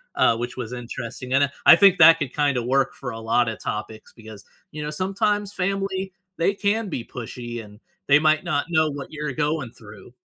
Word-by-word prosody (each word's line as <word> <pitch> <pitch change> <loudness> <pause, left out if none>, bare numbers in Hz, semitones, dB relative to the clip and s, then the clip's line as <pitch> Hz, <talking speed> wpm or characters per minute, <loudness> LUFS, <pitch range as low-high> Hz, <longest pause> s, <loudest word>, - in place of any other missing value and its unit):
Uh, 115 - +3
which 120 +2 -5
was 125 -1 -5
interesting, 120 +1 -6
and, 140 +1 +4
I 140 - -9 0.2
I - - +9
think 195 -1 +5
that 165 - +10
could 135 -3 -4
kinda 140 -4 +1
work 135 +2 +1
for 125 -2 -6
a 115 - -7
lotta 115 0 +1
topics, 110 +1 -6
because, 110 -3 -13 0.3
you 150 - -7
know, 150 - -4
sometimes 200 +4 -1
family, 195 0 -2 0.3
they 170 +4 +1
can 210 +1 -1
be 125 -8 -5
pushy, 120 -1 -7
and 105 0 -15 0.3
they 140 +1 +6
might 155 0 +2
not 145 - 0
know 160 -2 +2
what 140 -1 -8
you're 150 -2 -4
going 150 -3 -2
through. 105 +1 -15
140 Hz, 200 wpm, -23 LUFS, 120-170 Hz, 0.3 s, that